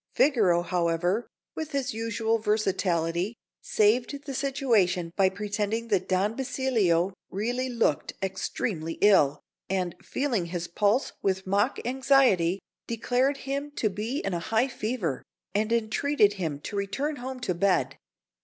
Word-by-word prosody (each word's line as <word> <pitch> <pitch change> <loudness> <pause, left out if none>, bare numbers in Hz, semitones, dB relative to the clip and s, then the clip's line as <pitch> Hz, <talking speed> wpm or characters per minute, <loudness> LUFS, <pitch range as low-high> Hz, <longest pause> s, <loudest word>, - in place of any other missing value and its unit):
Figaro, 205 - +4
however, 175 +4 0 0.3
with 315 -2 -5
his 275 -1 -1
usual 225 0 0
versatility, 195 -3 0 0.3
saved 240 +7 +1
the 275 - -5
situation 230 - +1
by 195 -2 +4
pretending 210 +3 -2
that 195 -4 +1
Don 195 +4 +1
Basilio 220 -10 +1 0.2
really 245 +6 -2
looked 230 - 0
extremely 190 -3 -3
ill, 190 -9 +5 0.3
and, 185 -2 -1
feeling 240 -11 -1
his 175 0 -4
pulse 205 +8 +1
with 190 -1 0
mock 200 +6 +1
anxiety, 250 -9 +3 0.3
declared 245 +4 +1
him 280 +2 -2
to 215 - 0
be 220 +8 -3
in 195 -1 -2
a 170 - -1
high 225 +8 +1
fever, 215 - -2 0.3
and 215 +2 0
entreated 230 0 +2
him 160 -8 -3
to 205 - -6
return 270 +10 -2
home 260 +1 -6
to 185 - 0
bed. 180 +1 +1
210 Hz, 135 wpm, -27 LUFS, 185-250 Hz, 0.3 s, ill